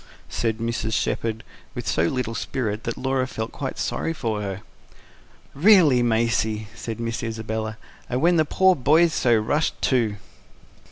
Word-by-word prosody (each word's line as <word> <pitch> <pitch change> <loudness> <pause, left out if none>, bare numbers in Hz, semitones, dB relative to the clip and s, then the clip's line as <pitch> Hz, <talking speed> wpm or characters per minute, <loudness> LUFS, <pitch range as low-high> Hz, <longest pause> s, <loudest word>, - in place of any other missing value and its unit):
"Tch, - - -23
tch, - - -22
tch!" - - -20
said 115 -2 0
Mrs. 115 -1 -2
Shepherd, 115 0 -1 0.3
with - - -5
so 80 - +2
little 125 0 -2
spirit 110 -2 -3
that 115 - -3
Laura 130 -1 0
felt 110 -2 -5
quite 135 -2 -5
sorry 165 - -2
for 110 -8 -2
her. 100 -1 -4 0.9
"REALLY, 160 - +6
Maisie!" 110 -2 0
said 115 -1 -6
Miss 115 -1 -3
Isabella. 110 -1 -4 0.3
"And 125 - 0
when 170 +4 +4
the 155 - +5
poor 190 +4 +4
boy's 155 +5 +4
so 120 -2 +3
rushed, 145 +9 0
too." 115 -6 +1
115 Hz, 165 wpm, -23 LUFS, 110-135 Hz, 0.9 s, REALLY